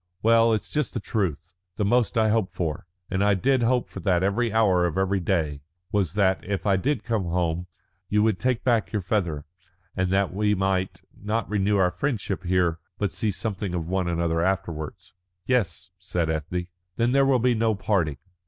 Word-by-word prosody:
"Well, 115 +1 +5
it's 110 - -1
just 150 -3 -1
the - - 0
truth. 90 -6 -2 0.2
The 105 - 0
most 120 +2 +2
I 110 -1 +4
hoped 110 -3 +1
for 80 -1 -3 0.2
and 95 +2 +1
I 100 -1 +4
did 130 +6 +2
hope 120 +1 +2
for - - -8
that 90 -3 +1
every 110 +4 +1
hour 100 -5 +3
of 85 - -4
every 95 0 +1
day 80 -6 -1 0.3
was 95 -6 0
that, 95 -2 +2
if 100 -2 -3
I 100 -2 +4
did 135 +10 0
come 115 -5 -1
home, 85 0 -1 0.4
you 105 0 +3
would 110 -4 +1
take 125 -2 0
back 120 -3 +1
your 105 -3 -2
feather, 85 -7 -1 0.5
and 95 0 0
that 95 -1 +1
we 105 +1 +1
might 95 -2 -1
not 105 +1 -2
renew 105 0 +1
our 90 -2 +3
friendship 100 -3 -2
here, 90 -2 +1 0.2
but 105 - -1
see 110 - -1
something 100 -2 -3
of 85 -2 -3
one 95 0 0
another 85 -1 0
afterwards." 85 -4 -3 0.3
"Yes," 95 -8 0
said 90 -3 -1
Ethne. 80 +3 -3 0.3
"Then 120 +1 +1
there 140 +1 +4
will 135 -2 +4
be 125 +1 +2
no 110 -1 +1
parting." 90 -8 0
95 Hz, 190 wpm, -25 LUFS, 90-110 Hz, 0.5 s, Well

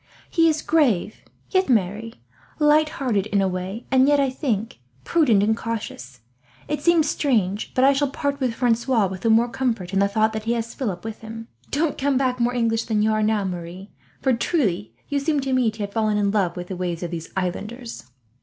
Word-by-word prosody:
He 330 -2 +4
is 310 -1 -1
grave, 250 - +2 0.3
yet 375 -5 +2
merry; 220 +1 0 0.4
light 305 0 +4
hearted 230 -9 -1
in 205 -1 +1
a 195 - +2
way, 185 +5 -4
and 260 0 +5
yet, 290 0 +4
I 275 -2 +2
think, 230 - -2 0.2
prudent 235 - +3
and 220 +1 +2
cautious. 135 - -6 0.5
It 300 -1 -2
seems 335 -1 +4
strange, 215 -10 0
but 255 - +3
I 275 +1 +6
shall 285 +1 +1
part 280 0 -2
with 250 -4 -1
Francois 235 -2 +2
with 190 -1 -5
the 230 - +1
more 225 +2 +5
comfort, 235 -7 -2
in 195 - +2
the 200 - +4
thought 220 +2 +1
that 220 0 -4
he 230 - +1
has 230 -1 -3
Philip 200 -10 -4
with 225 -1 -6
him. 225 +1 -8 0.2
"Don't 295 +1 0
come 275 -1 +1
back 255 -2 0
more 240 +1 +1
English 230 -1 +1
than 215 -3 +1
you 220 - +3
are 215 0 +1
now, 215 -1 +1
Marie; 180 +1 -6 0.3
for 265 - +2
truly 220 - 0 0.2
you 285 -1 0
seem 295 +1 0
to 265 -1 -2
me 255 -3 +3
to 215 -1 -5
have 200 0 -6
fallen 215 -2 +1
in 200 -1 +1
love 190 -4 0
with 175 0 -6
the 190 - -4
ways 175 -1 -3
of 175 - -4
these 165 -1 -6
islanders." 215 - -4
225 Hz, 215 wpm, -23 LUFS, 200-265 Hz, 0.5 s, I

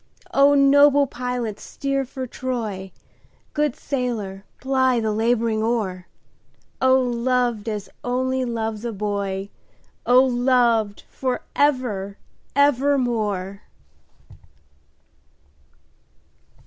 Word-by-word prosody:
O 280 +1 +5
noble 285 0 +6
pilot 250 -4 -4
steer 275 -1 -3
for 260 +1 -6
Troy, 225 -7 -4 0.6
Good 295 -3 0
sailor 220 -8 -4
ply 260 -2 +2
the 220 -1 -1
labouring 225 0 +1
oar,O 225 +4 -2
loved 245 -2 0
as 210 -2 -4 0.2
only 260 +1 0
loves 225 -2 -3
a 235 - -2
boy!O 200 +4 -1
loved 240 -4 +2
for 255 -2 -3
ever 235 -9 0 0.4
evermore! 240 -9 +1
245 Hz, 80 wpm, -22 LUFS, 210-260 Hz, 0.6 s, noble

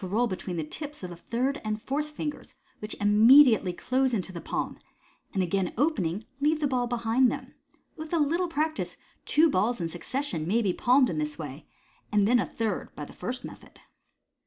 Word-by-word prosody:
roll 210 +6 +1
between 185 -4 -4
the 160 - -1
tips 295 - -7
of 180 - -5
the - - -7
third 255 - -2
and 215 0 -2
fourth 295 +6 -2
fingers, 300 0 -6 0.2
which 210 +1 -6
imme 220 +7 +8
diately 195 -8 +1
close 260 -1 +1
into 190 -2 -3
the 170 -2 -7
palm, - - -3 0.5
and, 190 -3 0
again 185 +1 0
opening, 215 - 0
leave 300 +2 +2
the 300 - 0
ball 250 -3 0
behind 240 +1 +2
them. - - -7 0.4
With 315 0 -8
a 340 - +2
little 330 +4 +1
practice, 315 -1 -2 0.3
two 320 +2 +5
balls 235 -2 +1
in 170 -1 -2
succession 175 - -3
may 225 +5 +2
be 190 -3 +1
palmed 250 +2 +4
in 155 - -2
this 150 0 -3
way, 150 -1 -8 0.4
and 205 -1 +3
then 245 +2 +4
a - - 0
third 220 -4 -3
by 150 - -6
the - - -13
first 250 +1 -5
method. - - -12
230 Hz, 195 wpm, -28 LUFS, 185-280 Hz, 0.5 s, imme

